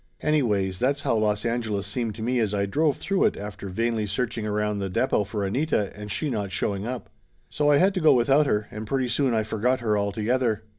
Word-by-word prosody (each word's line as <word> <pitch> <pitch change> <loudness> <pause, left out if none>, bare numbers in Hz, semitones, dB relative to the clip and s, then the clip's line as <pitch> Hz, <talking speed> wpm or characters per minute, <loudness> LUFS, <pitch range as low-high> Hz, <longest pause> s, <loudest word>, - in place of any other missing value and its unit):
Anyways, 105 -11 +1
that's 140 +3 0
how - - +1
Los 105 0 0
Angeles 110 -4 -1
seemed 110 +1 -3
to 110 - -6
me 125 +2 +1
as 105 -3 0
I 100 0 +1
drove 145 +8 +1
through 195 -1 +1
it - - +1
after 100 -1 -7
vainly 115 +2 -1
searching 115 +1 -2
around 105 0 -1
the 100 -1 -2
depot 105 +1 +1
for 100 0 -3
Anita, 105 -1 0
and 105 0 -8
she 155 - -1
not 105 -7 -2
showing 100 +3 -2
up. 125 -1 -6 0.4
So 150 0 +1
I 145 - +6
had 190 +5 +4
to 185 - -2
go 155 -2 +6
without 135 +5 +4
her, 105 -4 0
and 105 +1 -6
pretty 130 +1 0
soon 125 0 +1
I 110 - +2
forgot 110 +5 0
her 110 -3 +1
altogether. 110 +2 0
110 Hz, 220 wpm, -25 LUFS, 105-130 Hz, 0.4 s, I